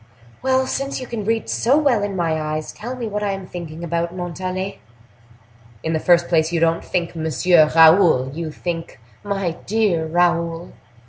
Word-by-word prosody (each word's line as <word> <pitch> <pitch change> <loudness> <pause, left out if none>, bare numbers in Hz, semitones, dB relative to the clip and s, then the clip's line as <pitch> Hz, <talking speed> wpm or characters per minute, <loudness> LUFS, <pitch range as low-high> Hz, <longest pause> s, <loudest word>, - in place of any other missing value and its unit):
"Well, 260 0 +2
since 275 +1 -3
you 255 - -6
can 230 -4 -5
read 225 +1 0
so 260 +5 +2
well 275 -8 +2
in 200 -1 -3
my 165 -3 0
eyes, 155 0 -3
tell 245 +4 -6
me 240 -3 -4
what 210 0 -3
I 205 -1 -1
am 195 -1 -6
thinking 170 -2 -8
about, 170 +1 -2
Montalais." 185 +2 -4 1.0
"In 160 - -1
the 160 - +1
first 175 +1 +3
place, 160 -1 +2
you 170 - 0
don't 165 0 +1
think, 175 -2 -2
Monsieur 160 0 +3
Raoul; 160 -5 +6
you 165 +1 -4
think, 165 -1 -5 0.2
My 195 -3 -2 0.2
dear 195 -7 +1
Raoul." 170 0 0
175 Hz, 175 wpm, -21 LUFS, 165-205 Hz, 1.0 s, Raoul